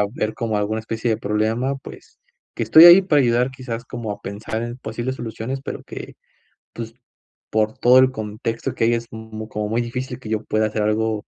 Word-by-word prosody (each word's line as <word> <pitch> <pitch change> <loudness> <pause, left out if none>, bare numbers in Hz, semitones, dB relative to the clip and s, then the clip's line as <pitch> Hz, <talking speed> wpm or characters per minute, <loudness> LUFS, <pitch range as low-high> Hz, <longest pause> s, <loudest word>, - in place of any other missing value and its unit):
haber, 105 +1 -2
como 115 -4 -1
alguna 105 +2 -1
especie 110 +1 -3
de 110 - +2
problema, 110 +7 -1
pues, 135 - -13 0.4
que - - -3
estoy 160 - +8
ahí 175 +2 +11
para 155 -7 +3
ayudar. 120 +1 +2
Quizás, 125 -2 -6
como 120 -4 -5
a 100 - -9
pensar 105 +3 -5
en 120 +1 -5
posibles 120 +1 -4
soluciones, 120 +3 -5
pero - - -5
que, - - -9 0.6
pues, 115 -1 -6 0.6
por 110 0 0
todo 125 +1 +6
el 130 0 +5
contexto 110 +1 -4
que - - 0
hay, 115 - +3
es 115 0 -3
m 110 -1 -8
como 105 -1 -3
muy 115 +2 +1
difícil, 125 +1 -4
que 115 - -9
yo 110 0 -2
pueda, 110 0 +1
hacer 110 0 -2
algo 110 0 0
115 Hz, 200 wpm, -21 LUFS, 110-125 Hz, 0.6 s, ahí